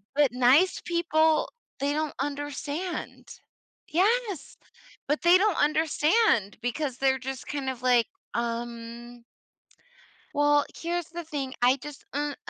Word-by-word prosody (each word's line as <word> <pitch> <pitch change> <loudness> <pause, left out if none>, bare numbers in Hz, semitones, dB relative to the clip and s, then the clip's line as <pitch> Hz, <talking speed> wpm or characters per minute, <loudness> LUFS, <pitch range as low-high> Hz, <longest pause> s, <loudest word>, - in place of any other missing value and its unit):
but 290 -2 +4
nice 255 +9 +4
people, 320 -2 +2 0.3
they 280 +1 0
don't 305 0 -1
understand. 290 +4 -4 0.6
Yes. 400 - 0 0.5
But 295 +2 0
they 345 +1 +7
don't 405 -1 +2
understand 305 - +2
because 250 +2 -2
they're 265 0 +2
just 265 0 -6
kind 270 -1 -3
of, 260 -2 -5
like, 245 -2 +4 0.3
um 235 0 -5 1.1
Well, 290 0 +3
here's 345 0 -3
the 345 +1 -6
thing, 280 -5 -4
I 250 +2 +5
just, 290 +1 -10
mm 290 +1 -1
uh, - - -8
290 Hz, 125 wpm, -27 LUFS, 255-320 Hz, 1.1 s, they